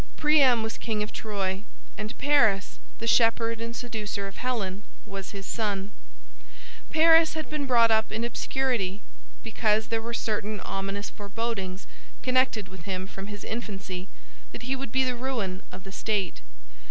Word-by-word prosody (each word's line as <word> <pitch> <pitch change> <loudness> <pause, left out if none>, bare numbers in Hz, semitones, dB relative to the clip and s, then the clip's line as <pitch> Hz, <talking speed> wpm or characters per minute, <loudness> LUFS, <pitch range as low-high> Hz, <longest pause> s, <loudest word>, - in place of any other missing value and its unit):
Priam 280 -7 +5
was 225 - -4
king 215 -2 -1
of 210 - -6
Troy, 195 -3 -2 0.3
and 215 0 -5
Paris, 235 -10 +3 0.2
the 230 - -5
shepherd 230 0 +4
and 230 0 -4
seducer 215 -5 -3
of 195 - -10
Helen, 210 -6 -1 0.2
was 195 -1 -6
his 195 -1 -7
son. 205 -3 -1 1.0
Paris 325 0 +6
had 315 -1 -4
been 295 -2 -1
brought 235 -3 +6
up 220 0 +3
in 225 +2 -1
obscurity, 235 -5 0 0.4
because 220 -1 +1
there 225 -1 +1
were 235 +1 -4
certain 210 -2 -1
ominous 195 +1 -3
forebodings 200 -3 -3 0.4
connected 255 -5 +3
with 185 -3 -11
him 185 -1 -2
from 195 0 -7
his 205 -1 -7
infancy 195 -5 -4 0.5
that - - -7
he 260 +2 0
would 265 -3 -5
be 265 +1 +3
the 255 -1 0
ruin 235 -7 -2
of 185 +1 -9
the 195 - -9
state. 200 - -1
220 Hz, 155 wpm, -28 LUFS, 195-240 Hz, 1.0 s, Paris